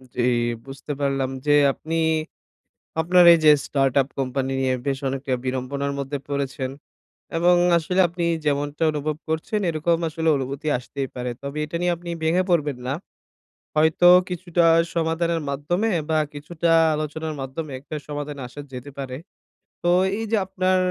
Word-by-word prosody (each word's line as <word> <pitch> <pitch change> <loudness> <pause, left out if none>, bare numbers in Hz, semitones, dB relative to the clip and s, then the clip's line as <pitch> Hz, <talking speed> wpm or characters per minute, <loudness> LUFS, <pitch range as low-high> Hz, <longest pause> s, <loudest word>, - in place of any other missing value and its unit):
জ্বি, 120 - 0 0.4
বুঝতে 135 +2 -8
পারলাম 135 -1 0 0.2
যে 145 - +3 0.2
আপনি 165 +1 -5 1.1
আপনার 175 +2 +5
এই 170 - +5
যে 155 - +9 0.2
startup 135 -1 +2
কোম্পানি 135 0 -1
নিয়ে 130 -1 +1
বেশ 135 -1 0
অনেকটা 135 0 -2
বিড়ম্বনার 130 +2 -2
মধ্যে 140 +1 -3
পড়েছেন 135 -2 -2 0.7
এবং 175 +1 +4 0.2
আসলে 180 +3 0
আপনি 170 0 -3 0.2
যেমনটা 145 +2 -1
অনুভব 150 0 -2
করছেন 160 +7 -1
এরকম 165 +1 +1
আসলে 160 +1 -2
অনুভূতি 140 +3 -4
আসতেই 135 +1 -5
পারে। 125 0 -3
তবে 140 +2 -5
এটা 160 +3 -5
নিয়ে 175 0 +2
আপনি 170 0 -8
ভেঙে 170 +4 +3
পড়বেন 150 -6 +1
না। 135 - -1 0.8
হয়তো 160 +3 +4 0.2
কিছুটা 175 -1 0 0.3
সমাধানের 165 0 0
মাধ্যমে 175 +10 -1 0.2
বা 155 - +3 0.2
কিছুটা 165 +3 -2 0.2
আলোচনার 155 +1 -3
মাধ্যমে 135 +3 -5
একটা 155 +2 -7
সমাধানে 145 -1 -5
আসা 145 - -9
যেতে 130 +3 -7
পারে। 130 -2 -5 0.7
তো 175 - +2 0.3
এই 225 - -3
যে 220 - +3
আপনার 185 0 +1
150 Hz, 145 wpm, -23 LUFS, 135-170 Hz, 1.1 s, যে